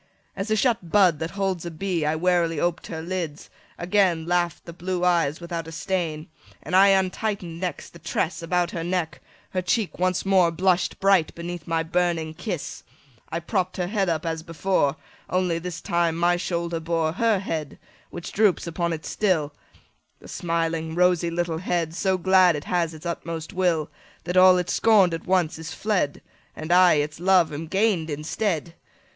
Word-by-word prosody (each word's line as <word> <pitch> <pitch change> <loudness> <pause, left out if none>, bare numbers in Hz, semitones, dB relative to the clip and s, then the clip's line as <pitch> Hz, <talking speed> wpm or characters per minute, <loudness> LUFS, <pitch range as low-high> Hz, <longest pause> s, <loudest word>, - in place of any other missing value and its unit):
As 195 +3 -4
a 215 - +3
shut 215 -5 +1
bud 185 -7 +4
that 160 - -3
holds 190 -3 -1
a 170 - -4
bee, 170 -1 -2
I 155 - +1
warily 170 -1 +1
oped 175 +1 -1
her 160 -1 -6
lids: 170 -4 -5 0.3
again 180 -3 +1
Laugh'd 175 -1 0
the 170 - -8
blue 180 +1 -2
eyes 165 -4 +2
without 170 -2 -5
a - - -8
stain. 165 -3 -3 0.2
45 - - -24
And 180 - -2
I 195 +1 +7
untighten'd 190 -2 0
next 180 -4 -5
the 170 - -13
tress 170 +1 -2
About 175 +1 0
her 165 - -4
neck; 175 -3 -2 0.3
her 185 - -1
cheek 200 +1 -1
once 185 0 0
more 190 -3 +4
Blush'd 180 +1 +1
bright 195 -4 +3
beneath 170 -1 -6
my 165 -1 0
burning 165 -1 0
kiss: 175 -1 -5 0.5
I 165 - -2
propp'd 185 +1 -2
her 180 - 0
head 195 0 0
up 160 0 -1
as 160 -1 -2
before, 165 -3 0 0.3
Only, 180 -2 0
this 175 -1 -6
time 170 -1 0
my 175 +1 +2
shoulder 170 -1 -2
bore 165 -1 0
50 185 - -4
Her 225 -3 +4
head, 160 -6 -4 0.3
which 175 - -7
droops 205 -4 +2
upon 170 0 -2
it 160 -1 -6
still: 165 -8 0 0.7
The - - -14
smiling 165 -1 -2
rosy 180 -1 +3
little 170 -1 -2
head, 170 -3 -1
So 190 +1 0
glad 185 -1 +4
it 145 - -5
has 170 -2 -1
its 155 - -13
utmost 165 -1 -5
will, 175 -4 +1 0.4
That 180 +2 -4
all 185 0 +7
it 180 -1 -1
scorn'd 200 -6 +4
at 165 - -5
once 180 -3 +1
is 160 +1 -7
fled, 195 -9 -1 0.3
And 155 +2 -5
I, 180 0 +6
its 150 +1 -1
love, 180 -3 +3
am 155 +3 -5
gain'd 190 -3 +1
instead! 160 +3 -2
175 Hz, 185 wpm, -24 LUFS, 165-185 Hz, 0.7 s, I